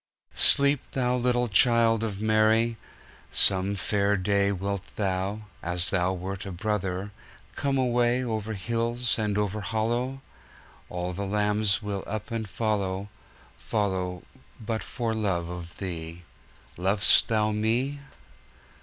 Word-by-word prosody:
Sleep, 140 -1 +5
Thou 125 -1 +1
little 125 0 +1
Child 115 +1 +4
of 105 -3 -3
Mary. 110 +2 +3 0.5
Some 95 +1 +3
fair 100 +1 +1
dayWilt 100 0 0
Thou, 100 +1 -2 0.2
as 85 +1 -1
Thou 95 -1 +1
wert 95 +1 -5
a - - -5
brother, 95 0 -2 0.4
Come 140 -2 0
awayOver 120 -3 0
hills 115 +4 -1
and 105 -2 0
over 105 0 -1
hollow? 120 +5 -2 0.7
All 90 0 -3
the 100 +2 -4
lambs 105 +1 +1
will 100 -2 -3
up 110 +1 -5
and 110 -2 -3
follow, 100 -2 -2 0.5
Follow 95 -4 -2 0.4
but 110 0 -3
for 115 -2 -3
love 95 -6 -1
of 90 -1 -8
Thee. 85 -2 -6 0.5
Lov'st 95 +4 +4
Thou 110 -1 +1
me? 115 +7 0
105 Hz, 120 wpm, -27 LUFS, 95-115 Hz, 0.7 s, Sleep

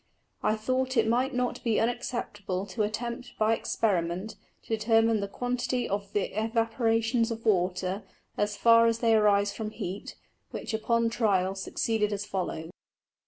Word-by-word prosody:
I 215 +1 +2
thought 255 +3 -1
it 220 -1 +4
might 250 +4 +2
not 250 0 -1
be 225 -3 +2
unacceptable 210 -5 -2
to 205 +3 -4
attempt 235 +4 -3
by 220 +1 +3
Experiment 190 -3 -1 0.3
to 225 - -1
determine 225 0 +3
the 200 - -2
Quantity 245 +3 -2
of 200 0 -3
the 200 -1 -1
Evaporations 225 0 +1
of 230 0 -5
Water, 185 -1 +1 0.3
as 205 0 -1
far 230 +1 +6
as 230 0 +2
they 230 -1 +3
arise 205 -2 +4
from 220 -1 -4
Heat, 200 -3 -6 0.3
which - - -5
upon 230 +1 +1
Trial 195 -5 +1
succeeded 210 +2 -1
as 205 0 -3
follows. 175 -4 -4
220 Hz, 150 wpm, -28 LUFS, 200-230 Hz, 0.3 s, far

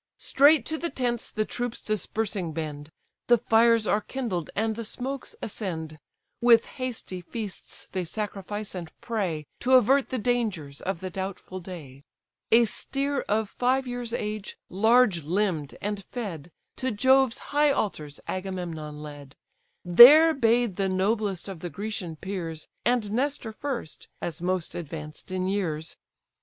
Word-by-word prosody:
Straight 285 -2 +5
to 315 0 -3
the 340 - -2
tents 240 -4 -2
the 215 - -1
troops 245 +1 -4
dispersing 210 -4 -2
bend, 150 -2 -5 0.4
The 240 - +6
fires 230 0 +4
are 210 - +2
kindled, 210 -9 -3
and 220 +1 0
the 230 - -4
smokes 260 +4 -4
ascend; 160 -7 -4 0.4
With 235 -1 +6 0.2
hasty 225 -7 -4
feasts 205 +2 -6
they 185 -1 -2
sacrifice, 205 +2 -4
and 175 -4 -6
pray, 195 -10 -2
To 255 +2 +1
avert 260 +2 +5
the 260 - -2
dangers 210 - -1
of 185 -3 -3
the 185 0 -5
doubtful 190 0 -5
day. 160 -7 -9 0.5
A 235 +1 +7
steer 275 +5 -2
of 215 0 +1
five 260 +2 +1
years' 245 -1 -4
age, 210 -3 -4
large 220 -2 +4
limb'd, 165 -2 -1
and 205 -1 -2
fed, 180 - -6 0.3
To 260 - -1
Jove's 260 +2 +4 0.2
high 295 0 +5
altars 155 - -2
Agamemnon 170 -6 -4
led: 145 -2 -10 0.5
There 285 - +10
bade 235 - +2
the 195 -1 +1
noblest 195 0 0
of 190 -4 -6
the 175 - -5
Grecian 200 -4 -4
peers; 165 -3 -5 0.2
And 235 -3 +1
Nestor 260 0 -1
first, 235 - -5
as 165 -1 -5
most 180 -1 -1
advanced 155 +1 -7
in 185 0 -1
years. 165 -6 -2
205 Hz, 145 wpm, -27 LUFS, 175-240 Hz, 0.5 s, There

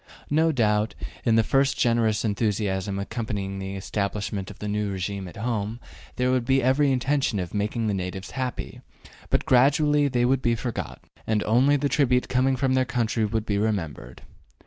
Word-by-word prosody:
No 160 +2 +3
doubt, 105 -5 +1 0.3
in 115 -2 +4
the 115 - +4
first 135 +3 +2
generous 115 -2 +2
enthusiasm 100 -2 -1
accompanying 100 -2 -4
the 95 0 -5
establishment 100 +1 -3
of 105 - -11
the 105 - -5
new 105 0 -1
regime 95 0 -4
at 90 - -11
home, 110 0 -2 0.4
there 125 0 +1
would 130 -2 +1
be 135 +2 +2
every 135 +2 +3
intention 130 -2 +1
of 90 -3 -4
making 105 +3 -1
the 105 - 0
natives 95 0 -4
happy, 130 -2 -4 0.5
but - - +1
gradually 145 +3 +4
they 120 -3 +1
would 130 +1 +2
be 120 -2 +2
forgotten, 115 -1 -5 0.2
and 110 -1 +1
only 130 +6 +4
the 145 +1 0
tribute 130 -4 +2
coming 130 +1 +2
from 130 +1 +1
their 130 0 +3
country 120 -3 0
would 110 +1 -2
be 100 -2 0
remembered. 80 - -3
115 Hz, 175 wpm, -25 LUFS, 100-130 Hz, 0.5 s, in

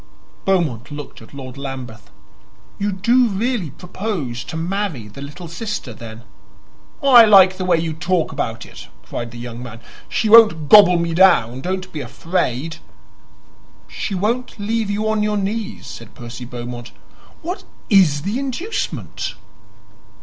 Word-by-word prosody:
Beaumont 160 - 0
looked 145 -4 -8
at 110 - -14
Lord 135 -1 -9
Lambeth. 130 -4 -7 0.7
"You 205 0 0
do 235 +6 +3
really 215 - -1
propose 155 - -4
to 160 - -6
marry 170 - -2
the 120 +7 -11
little 150 +5 -8
sister, 170 - -5
then?" 115 +1 -10 0.8
"I 245 -4 +9
like 190 -3 +7
the 185 - -3
way 175 -2 +3
you 160 -1 -2
talk 170 +1 0
about 115 0 -3
it!" - - -12 0.2
cried 120 -1 -5
the 120 - -11
young 120 0 -7
man. 115 -2 -9 0.3
"She 220 - 0
won't 210 -9 +7
gobble 195 -3 +8
me 170 -1 -1
down; 130 -9 +4
don't 185 +2 -4
be 155 - -4
afraid." 165 -2 -2 1.1
"She 200 - -4
won't 230 +7 -1
leave 220 +1 -1
you 210 +2 -1
on 220 -1 +1
your 210 0 +1
knees," 210 +2 -3
said - - -10
Percy 120 0 -8
Beaumont. 120 0 -7 0.5
"What 360 +4 -4 0.3
IS 165 -8 +5
the 205 +7 -2
inducement?" 335 - -4
180 Hz, 145 wpm, -20 LUFS, 130-210 Hz, 1.1 s, I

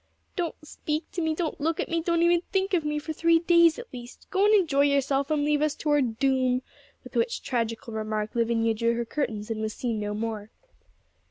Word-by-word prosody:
'Don't 345 -3 -2
speak 305 +1 -3
to 350 - -3
me; 320 -1 0
don't 315 -3 -3
look 320 +2 0
at - - -1
me; 335 -1 -1
don't 335 0 +1
even 345 0 +4
think 385 0 0
of 340 -4 +2
me 300 0 -1
for 300 +2 -4
three 330 +1 +4
days 340 -1 +4
at 480 0 -10
least. 245 0 -10
Go 390 +1 +3
and 425 +1 +6
enjoy 315 -8 +3
yourself, 280 -1 +2
and 300 -2 +1
leave 295 0 +2
us 305 -1 +1
to 300 - -2
our 295 -1 +4
doom;' 255 +1 +1 0.4
with - - -13
which 465 0 0
tragical 230 -2 -2
remark 215 -1 -2
Lavinia 230 -1 +1
drew 230 +1 +1
her 235 0 -2
curtains, 225 -5 -3
and 220 -1 -3
was 215 0 -3
seen 230 -4 -2
no 210 0 -3
more. 215 -1 -4
285 Hz, 220 wpm, -26 LUFS, 230-330 Hz, 0.4 s, and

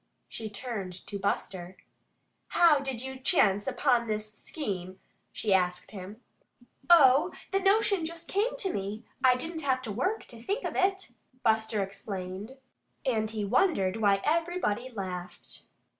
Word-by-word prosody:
She 220 -1 -6
turned 205 -3 -5
to 200 0 -5
Buster. 185 -2 -2 0.7
"How 330 -4 +5
did 265 -3 -4
you 265 0 -6
chance 205 - +3
upon 245 -4 +2
this 215 0 -2
scheme?" 190 - -5 0.3
she 210 -3 0
asked 180 -1 +1
him. 205 +3 -9 0.7
"Oh, 300 0 +7 0.2
the 390 - +2
notion 395 -1 +3
just 330 +1 -6
came 450 +6 0
to 390 -7 -1
me. 200 +3 -4 0.2
I 255 -1 +6
didn't 325 +5 -5
have 265 -3 +1
to 225 - -3
WORK, 325 - -1
to 230 -1 -11
think 405 - -2
of - - -3
it," 385 0 +1 0.3
Buster 220 -2 +2
explained. 195 +4 -6 0.5
And 220 -4 +1
he 215 -2 -2
wondered 210 - +2
why 200 -2 +3
everybody 320 - 0
laughed. 185 -6 -7
225 Hz, 145 wpm, -29 LUFS, 200-320 Hz, 0.7 s, Oh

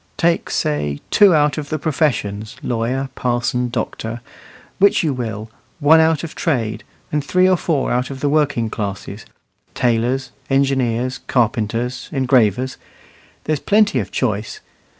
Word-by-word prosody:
Take, 170 0 +1
say, 75 -1 -1
two 200 -5 +6
out 150 -1 +2
of 145 -1 -7
the 155 - -1
professions, 130 -9 -1
lawyer, 125 +3 -1
parson, 125 0 -1
doctor 115 0 -4 0.6
which 200 -1 +4
you 155 -4 +1
will; 110 -3 -5 0.3
one 155 +2 +6
out 160 -1 +3
of 165 - -6
trade; 115 -9 -1 0.3
and 150 -1 0
three 185 +5 +3
or 185 - +4
four 160 -5 -1
out 125 +1 0
of 135 -1 -7
the 145 - 0
working 145 -6 +1
classes 100 -3 -5 0.5
tailors, 125 +2 0 0.2
engineers, 130 -2 +1
carpenters, 115 +1 -1
engravers. 130 -3 +2 0.7
There's 155 -2 -1
plenty 205 -8 +3
of 105 - -4
choice. 110 -4 -2
130 Hz, 135 wpm, -19 LUFS, 115-150 Hz, 0.7 s, two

